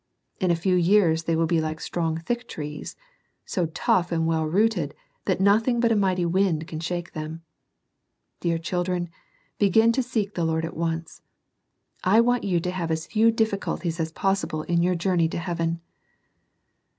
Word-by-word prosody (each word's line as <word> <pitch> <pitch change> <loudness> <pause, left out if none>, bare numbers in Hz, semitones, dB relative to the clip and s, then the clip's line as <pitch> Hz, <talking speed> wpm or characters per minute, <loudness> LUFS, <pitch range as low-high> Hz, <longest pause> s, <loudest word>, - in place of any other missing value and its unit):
In 185 -4 +1
a 170 - +4
few 185 +3 0
years 175 -3 +3
they 165 - +1
will 165 +1 +2
be 165 0 +1
like 155 0 -3
strong 165 -2 -2
thick 240 +9 -3
trees, 150 -1 -6 0.3
— - - -44 0.2
so 175 -3 -1
tough 175 +2 +1
and 165 -1 +1
well 160 -1 +1
rooted, 180 -4 +1 0.3
that - - +1
nothing 220 +5 +3
but 235 -1 +3
a - - +4
mighty 185 -3 +1
wind 170 -3 +1
can 155 - -5
shake 175 +1 -4
them. 155 +1 -6 1.0
Dear 170 -1 0
children, 175 +1 -2 0.5
begin 220 +3 +5
to 260 - +1
seek 220 -5 -2
the 170 - -1
Lord 160 0 0
at 165 - -7
once. 165 0 -3 0.8
I 200 +5 +5
want 245 +1 +3
you 180 -4 +1
to 180 - -2
have 180 -3 -3
as 160 0 -1
few 225 +1 +3
difficulties 200 -6 -1
as 160 0 -1
possible 195 -4 -1
in 170 +1 +1
your 180 +1 +2
journey 170 -2 +1
to - - -4
heaven. 170 -1 -2
175 Hz, 175 wpm, -25 LUFS, 165-195 Hz, 1.0 s, begin